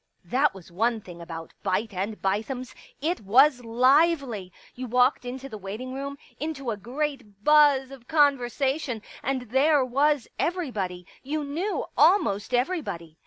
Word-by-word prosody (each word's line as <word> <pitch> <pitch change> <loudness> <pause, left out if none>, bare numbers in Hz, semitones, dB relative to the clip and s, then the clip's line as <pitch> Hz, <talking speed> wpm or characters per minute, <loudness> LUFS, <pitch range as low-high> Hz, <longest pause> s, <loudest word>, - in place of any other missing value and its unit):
1 175 - -23
That 270 -1 +3
was 180 -3 -13
one 225 +5 +1
thing 175 -4 -11
about 165 -1 -8
Beit 205 +2 -1
and 200 +4 -3
Bithems; 225 +6 -2 0.3
it 330 +1 -1
was 250 +5 +5
lively. 255 - +2 0.2
You 255 +1 -6
walked 250 +2 +3
into 260 +2 -6
the 215 -5 -8
waiting 215 +7 -6
room, 280 +1 -5 0.2
into 275 -5 -3
a - - -2
great 240 -2 -5
buzz 290 -2 +5
of 255 -3 -12
conversation, 275 -4 +1 0.2
and 265 -1 -1
there 280 +1 +4
was 280 +2 +2
every 350 -5 -1
body; 180 -4 -4 0.2
you 300 +3 -3
knew 330 +9 -2
almost 225 - +3
everybody. 245 - -2
255 Hz, 150 wpm, -26 LUFS, 210-285 Hz, 0.3 s, was